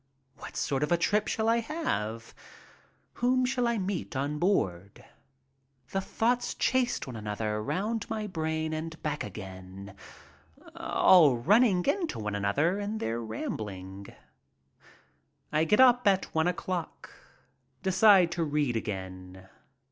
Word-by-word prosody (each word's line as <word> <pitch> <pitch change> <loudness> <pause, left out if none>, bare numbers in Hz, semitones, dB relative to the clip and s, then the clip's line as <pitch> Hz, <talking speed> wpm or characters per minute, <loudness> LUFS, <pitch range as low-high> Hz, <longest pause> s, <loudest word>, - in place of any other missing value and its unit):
What - - -9
sort 135 -1 -1
of 150 - -1
a 175 - +4
trip 210 +5 +1
shall 220 0 -1
I 230 +1 +4
have? 115 - -3 0.8
Whom 255 +1 +1
shall 250 -1 0
I 235 -1 0
meet 190 -6 -3
on 145 +3 -2
board? 100 - -1 0.9
The 195 - -1
thoughts 240 +5 -1
chased 255 -2 0
one 130 - -8
another 105 0 -3
round 210 - -2
my 220 -1 -3
brain 160 -4 -2
and 160 +1 -5
back 150 -1 -2
again, 95 -1 -9 0.8
all 155 -9 +5
running 195 - +3
into 340 +3 0
one 105 -1 -3
another 140 - +1
in 205 +2 -3
their 115 - -2
rambling. 100 -3 -6 1.4
I 155 +1 +2
get 210 +8 +2
up 250 -2 +6
at 190 -1 +2
one 160 +1 +2
o'clock. 180 0 -4 0.7
Decide 190 -2 +5
to 175 -1 -1
read 145 -5 0
again. 95 -3 -6
160 Hz, 130 wpm, -29 LUFS, -, 1.4 s, up